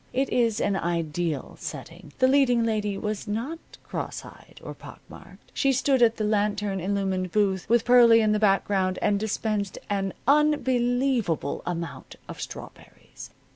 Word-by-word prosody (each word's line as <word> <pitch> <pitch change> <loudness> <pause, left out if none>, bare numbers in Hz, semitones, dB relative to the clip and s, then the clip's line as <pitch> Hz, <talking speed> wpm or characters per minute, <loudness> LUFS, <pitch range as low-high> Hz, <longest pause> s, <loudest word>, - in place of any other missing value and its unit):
It 270 +1 0
is 230 -3 +1
an 200 - 0
ideal 170 -3 -2
setting. - - -8
The 255 - +4
leading 260 -3 +3
lady 210 -3 -1
was 210 0 -4
not 235 +11 -3 0.2
cross - - -5
eyed - - -15
or - - -7
pock - - -13
marked. - - -15
She 275 - +2
stood 265 0 +1
at 230 -1 +4
the 215 - -2
lantern 210 -2 0
illumined 190 -1 -2
booth, 195 -2 0
with 235 0 +3
Pearlie 235 -2 +6
in 215 -1 +2
the 210 - +1
background, 195 -2 +1
and 205 -1 +1
dispensed 215 -1 -2
an 195 -1 -1
unbelievable 255 - +1
amount 170 -1 -5
of - - -8
strawberries. - - -10
210 Hz, 150 wpm, -25 LUFS, 195-245 Hz, 0.2 s, Pearlie